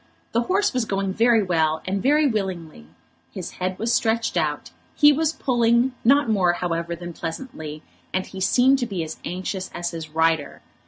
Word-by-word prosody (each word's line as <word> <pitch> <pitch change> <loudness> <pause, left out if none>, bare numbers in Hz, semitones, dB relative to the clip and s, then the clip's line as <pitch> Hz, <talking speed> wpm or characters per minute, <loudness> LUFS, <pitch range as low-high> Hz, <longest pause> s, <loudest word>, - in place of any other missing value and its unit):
The 230 - +2
horse 380 +10 +1
was 250 -3 0
going 195 -2 -2
very 230 0 +4
well, 160 -3 +1
and 195 +1 -1
very 295 +3 +3
willingly. 185 - -3 0.4
His 185 -3 -6
head 185 0 -3
was 230 +2 0
stretched 225 -2 +1
out, 155 -3 -1 0.2
he 295 0 +6
was 315 +2 +1
pulling, 240 -3 +2
not 280 +4 +4
more, 190 -5 +3
however, 170 -1 -2
than 175 0 -8
pleasantly, 160 - -7 0.3
and 185 0 -1
he 190 - -9
seemed 260 +7 +4
to 245 - -1
be 185 -6 -3
as 160 0 -7
anxious 185 +1 -4
as 175 0 -3
his 165 -2 -7
rider. 160 -1 0
190 Hz, 175 wpm, -23 LUFS, 170-235 Hz, 0.4 s, he